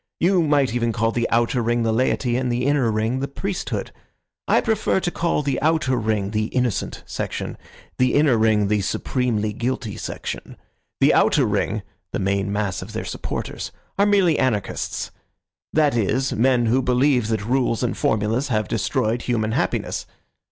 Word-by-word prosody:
You 180 Hz, +1 st, +3 dB
might 145 Hz, -6 st, +2 dB
even 120 Hz, -1 st, +1 dB
call 115 Hz, 0 st, 0 dB
the 120 Hz, 0 st, -1 dB
outer 120 Hz, +2 st, +2 dB
ring 120 Hz, +1 st, +1 dB
the 110 Hz, -1 st, +1 dB
laity 125 Hz, 0 st, +1 dB
and 125 Hz, 0 st, 0 dB
the 120 Hz, +1 st, 0 dB
inner 140 Hz, -5 st, +2 dB
ring 110 Hz, +4 st, 0 dB
the 140 Hz, -, -2 dB
priesthood. 190 Hz, +7 st, -4 dB, 0.6 s
I -, -, +4 dB
prefer 220 Hz, -4 st, +1 dB
to 175 Hz, -, -2 dB
call 165 Hz, -3 st, 0 dB
the 140 Hz, -2 st, -1 dB
outer 150 Hz, -4 st, +2 dB
ring 105 Hz, -4 st, -1 dB
the 110 Hz, 0 st, 0 dB
innocent 125 Hz, -2 st, -2 dB
section, -, -, -4 dB, 0.4 s
the 130 Hz, 0 st, +3 dB
inner 145 Hz, -4 st, +4 dB
ring 110 Hz, -2 st, +3 dB
the 105 Hz, 0 st, +1 dB
supremely 110 Hz, +1 st, -1 dB
guilty 120 Hz, -1 st, -3 dB
section. -, -, -6 dB, 0.4 s
The -, -, +5 dB
outer -, -, +4 dB
ring—the -, -, -3 dB
main 100 Hz, +1 st, 0 dB
mass 100 Hz, -3 st, -1 dB
of 100 Hz, +4 st, -9 dB
their 110 Hz, -, -4 dB
supporters—are 200 Hz, -, -4 dB
merely 190 Hz, -6 st, +3 dB
anarchists; 105 Hz, -7 st, -1 dB, 0.6 s
that 150 Hz, -4 st, +3 dB
is, 125 Hz, +4 st, +1 dB
men 120 Hz, +1 st, +3 dB
who 125 Hz, +4 st, +3 dB
believe 125 Hz, -1 st, +2 dB
that 110 Hz, -2 st, -1 dB
rules 125 Hz, -1 st, +1 dB
and 120 Hz, -, 0 dB
formulas 115 Hz, 0 st, 0 dB
have 110 Hz, -6 st, 0 dB
destroyed 110 Hz, +5 st, 0 dB
human 110 Hz, -3 st, -1 dB
happiness. -, -, -1 dB
120 Hz, 160 wpm, -22 LUFS, 110-135 Hz, 0.6 s, The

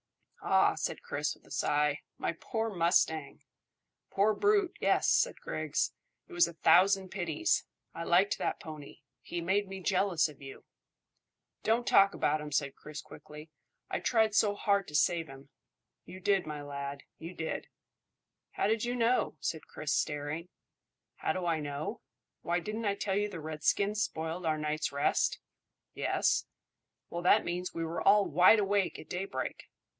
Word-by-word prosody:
"Ah," -, -, +4 dB
said -, -, -4 dB
Chris, -, -, -2 dB
with -, -, -26 dB
a -, -, -19 dB
sigh. 150 Hz, 0 st, +1 dB, 0.2 s
"My -, -, -1 dB
poor 225 Hz, +6 st, -3 dB
mustang!" 165 Hz, -5 st, +1 dB, 0.7 s
"Poor 205 Hz, +2 st, +2 dB
brute, 410 Hz, -, +2 dB
yes," -, -, +2 dB
said -, -, +2 dB
Griggs. -, -, -2 dB, 0.3 s
"It 360 Hz, -, -13 dB
was 345 Hz, -1 st, +4 dB
a -, -, -8 dB
thousand 190 Hz, +3 st, +4 dB
pities. 210 Hz, -, 0 dB, 0.3 s
I 165 Hz, -, -5 dB
liked 185 Hz, +4 st, +3 dB
that -, -, -1 dB
pony. 155 Hz, -3 st, -10 dB, 0.2 s
He 175 Hz, -, -5 dB
made 190 Hz, +4 st, +1 dB
me 190 Hz, 0 st, -7 dB
jealous 185 Hz, -3 st, +2 dB
of 150 Hz, -3 st, -14 dB
you." 135 Hz, -1 st, -10 dB, 1.0 s
"Don't 230 Hz, +2 st, +1 dB
talk 195 Hz, 0 st, +5 dB
about 150 Hz, +1 st, +1 dB
him," 150 Hz, 0 st, -7 dB
said 140 Hz, -1 st, 0 dB
Chris 150 Hz, -1 st, -9 dB
quickly. 150 Hz, +1 st, -12 dB, 0.4 s
"I -, -, 0 dB
tried 220 Hz, -3 st, +2 dB
so 205 Hz, -1 st, +3 dB
hard 200 Hz, -2 st, +1 dB
to 150 Hz, -, -8 dB
save 165 Hz, +2 st, +2 dB
him." 135 Hz, 0 st, -13 dB, 0.6 s
"You 185 Hz, -, -10 dB
did, 195 Hz, -2 st, +1 dB
my 150 Hz, -1 st, -5 dB
lad; 140 Hz, 0 st, -6 dB, 0.2 s
you 170 Hz, +3 st, -8 dB
did." 160 Hz, -1 st, -4 dB, 0.9 s
"How -, -, 0 dB
do 210 Hz, -, +4 dB
you 240 Hz, +2 st, -2 dB
know?" 245 Hz, +1 st, +1 dB
said 160 Hz, -, -4 dB
Chris, 150 Hz, -1 st, -3 dB
staring. 150 Hz, +3 st, -2 dB, 0.7 s
"How -, -, -1 dB
do 185 Hz, -1 st, -3 dB
I 165 Hz, -2 st, +1 dB
know? 150 Hz, -, -4 dB, 0.4 s
Why, 175 Hz, +1 st, 0 dB
didn't 215 Hz, +5 st, -4 dB
I 200 Hz, -1 st, +1 dB
tell 195 Hz, -1 st, -2 dB
you 205 Hz, +1 st, 0 dB
the 180 Hz, -, -7 dB
redskins 180 Hz, +7 st, 0 dB
spoiled 165 Hz, -1 st, -3 dB
our 155 Hz, -1 st, +1 dB
night's 150 Hz, 0 st, -2 dB
rest?" 140 Hz, 0 st, +1 dB, 0.6 s
"Yes." -, -, +1 dB, 0.6 s
"Well, 170 Hz, -, -3 dB
that 180 Hz, -, +4 dB
means 180 Hz, +1 st, -3 dB
we 165 Hz, 0 st, -2 dB
were 165 Hz, 0 st, -4 dB
all 205 Hz, 0 st, +5 dB
wide 180 Hz, +8 st, +6 dB
awake 200 Hz, -2 st, +1 dB
at -, -, -11 dB
daybreak." 190 Hz, +2 st, -4 dB
175 Hz, 165 wpm, -31 LUFS, 155-205 Hz, 1.0 s, wide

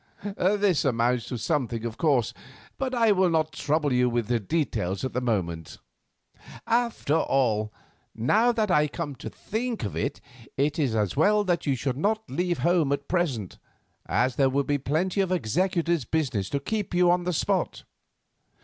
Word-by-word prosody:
This 200 Hz, -2 st, +1 dB
amounts 120 Hz, -2 st, +1 dB
to 125 Hz, -, -4 dB
something, 120 Hz, -2 st, -1 dB
of 115 Hz, -1 st, -4 dB
course, 135 Hz, -6 st, +1 dB, 0.5 s
but 260 Hz, -1 st, -1 dB
I 230 Hz, -2 st, +4 dB
will 190 Hz, -2 st, +3 dB
not 160 Hz, -1 st, +1 dB
trouble 150 Hz, -1 st, 0 dB
you 125 Hz, 0 st, +3 dB
with 120 Hz, -3 st, -1 dB
details 100 Hz, -, -1 dB
at 130 Hz, -, -4 dB
the 125 Hz, -, -1 dB
moment. 85 Hz, -9 st, -2 dB, 0.9 s
"After 230 Hz, -9 st, +1 dB
all, 110 Hz, -8 st, +1 dB, 0.4 s
now 215 Hz, -, +3 dB
that 220 Hz, -4 st, 0 dB
I 150 Hz, -3 st, +4 dB
come 150 Hz, -1 st, -5 dB
to -, -, -7 dB
think 230 Hz, +2 st, -4 dB
of 100 Hz, -, -4 dB
it, -, -, -2 dB, 0.4 s
it 145 Hz, +4 st, +1 dB
is 130 Hz, -7 st, +1 dB
as 105 Hz, -3 st, 0 dB
well 205 Hz, +8 st, +3 dB
that 175 Hz, -5 st, -1 dB
you 140 Hz, -, +2 dB
should 130 Hz, +1 st, -2 dB
not 215 Hz, +7 st, 0 dB
leave 175 Hz, +5 st, -1 dB
home 170 Hz, -5 st, +3 dB
at 140 Hz, -, -2 dB
present, 145 Hz, -, -1 dB, 0.5 s
as 125 Hz, 0 st, +1 dB
there 135 Hz, -1 st, +4 dB
will 140 Hz, +2 st, +1 dB
be 145 Hz, +1 st, 0 dB
plenty 175 Hz, +8 st, 0 dB
of 190 Hz, -2 st, -1 dB
executor's 170 Hz, -, 0 dB
business 120 Hz, -10 st, -1 dB
to 140 Hz, -, -1 dB
keep 205 Hz, +4 st, -3 dB
you 175 Hz, 0 st, +5 dB
on 180 Hz, 0 st, +1 dB
the 180 Hz, -, 0 dB
spot. -, -, -1 dB
150 Hz, 170 wpm, -26 LUFS, 125-180 Hz, 0.9 s, you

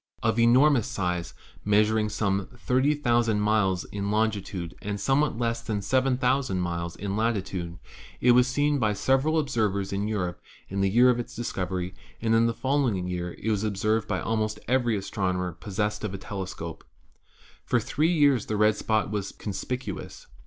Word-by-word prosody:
Of 115 Hz, +1 st, +1 dB
enormous 125 Hz, +2 st, +5 dB
size, 90 Hz, -3 st, -2 dB, 0.3 s
measuring 105 Hz, +1 st, +3 dB
some 100 Hz, -2 st, -1 dB
30,000 125 Hz, -4 st, +2 dB
miles 105 Hz, -4 st, +1 dB
in 100 Hz, 0 st, -4 dB
longitude 105 Hz, -5 st, -1 dB
and 100 Hz, 0 st, -3 dB
somewhat 135 Hz, +4 st, +1 dB
less 115 Hz, -1 st, -1 dB
than 105 Hz, -3 st, -3 dB
7,000 130 Hz, -2 st, +1 dB
miles 85 Hz, -1 st, -3 dB
in 100 Hz, 0 st, -4 dB
latitude, 95 Hz, -6 st, -2 dB, 0.4 s
it 125 Hz, -, +5 dB
was 125 Hz, +1 st, +5 dB
seen 145 Hz, +2 st, +1 dB
by 110 Hz, -3 st, +2 dB
several} 135 Hz, +9 st, +2 dB
observers 105 Hz, -9 st, 0 dB
in 100 Hz, +1 st, -1 dB
Europe 90 Hz, -5 st, -2 dB, 0.3 s
in 100 Hz, +1 st, -2 dB
the 95 Hz, -, +3 dB
year 120 Hz, +5 st, +6 dB
of 120 Hz, -, -1 dB
its 120 Hz, -, -6 dB
discovery, 95 Hz, -5 st, -3 dB, 0.3 s
and 115 Hz, 0 st, +1 dB
in 115 Hz, +1 st, +4 dB
the 115 Hz, -, 0 dB
following 130 Hz, -9 st, 0 dB
year 90 Hz, -1 st, -4 dB
was 110 Hz, -2 st, +1 dB
observed 110 Hz, +1 st, 0 dB
by -, -, -1 dB
almost 110 Hz, -1 st, -1 dB
every 120 Hz, -3 st, +2 dB
astrono 95 Hz, -1 st, -2 dB
mer 90 Hz, 0 st, -2 dB
possessed 105 Hz, +5 st, -3 dB
of 100 Hz, -2 st, -3 dB
a -, -, -4 dB
telescope. 95 Hz, -4 st, -6 dB, 0.8 s
For -, -, +1 dB
three 160 Hz, +3 st, +1 dB
years 145 Hz, -, +3 dB
the 110 Hz, -, -1 dB
red 105 Hz, 0 st, +4 dB
spot 110 Hz, -1 st, 0 dB
was 100 Hz, -2 st, -3 dB
conspicuous. 110 Hz, +1 st, -5 dB
105 Hz, 160 wpm, -26 LUFS, 95-120 Hz, 0.8 s, year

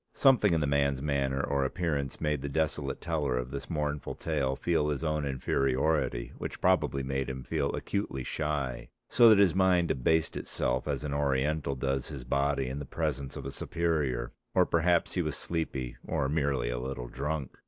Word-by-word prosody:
Something 115 Hz, -10 st, +5 dB
in 80 Hz, -, +1 dB
the -, -, +2 dB
man's 70 Hz, -1 st, +2 dB
manner 70 Hz, -1 st, 0 dB
or 70 Hz, -1 st, +1 dB
appearance 70 Hz, -2 st, -2 dB
made 75 Hz, -3 st, 0 dB
the 70 Hz, -, -3 dB
desolate 75 Hz, -2 st, -1 dB
teller 75 Hz, -7 st, 0 dB
of 60 Hz, +1 st, -3 dB
this 70 Hz, -, -5 dB
mournful 75 Hz, -3 st, -2 dB
tale 70 Hz, -5 st, -1 dB
feel 75 Hz, +1 st, +1 dB
his 75 Hz, +1 st, -2 dB
own 75 Hz, -2 st, 0 dB
inferiority, 70 Hz, 0 st, 0 dB
which -, -, -5 dB
probably 70 Hz, -1 st, +2 dB
made 65 Hz, 0 st, -2 dB
him 65 Hz, -1 st, -5 dB
feel 70 Hz, +2 st, -1 dB
acutely 100 Hz, -10 st, -3 dB
shy, 70 Hz, -4 st, -2 dB, 0.2 s
so 120 Hz, -2 st, +7 dB
that 110 Hz, -, +7 dB
his 100 Hz, -5 st, +5 dB
mind 90 Hz, -2 st, +3 dB
abased 80 Hz, +5 st, +1 dB
itself 65 Hz, +3 st, -2 dB
as 70 Hz, -1 st, -2 dB
an 75 Hz, -2 st, -3 dB
Oriental 70 Hz, +1 st, 0 dB
does 65 Hz, 0 st, -1 dB
his 65 Hz, -4 st, -7 dB
body 70 Hz, +2 st, +1 dB
in 65 Hz, +3 st, -4 dB
the 70 Hz, -, -5 dB
presence 70 Hz, -4 st, -2 dB
of -, -, -6 dB
a 70 Hz, -, -4 dB
superior, 75 Hz, -8 st, -1 dB, 0.2 s
or -, -, +5 dB
perhaps 85 Hz, +1 st, +2 dB
he 90 Hz, -, +1 dB
was 75 Hz, -4 st, -2 dB
sleepy, 70 Hz, -7 st, -3 dB
or 70 Hz, -, 0 dB
merely 70 Hz, -4 st, 0 dB
a -, -, -2 dB
little 65 Hz, -1 st, -4 dB
drunk. 70 Hz, +1 st, -4 dB
70 Hz, 185 wpm, -30 LUFS, 65-80 Hz, 0.2 s, so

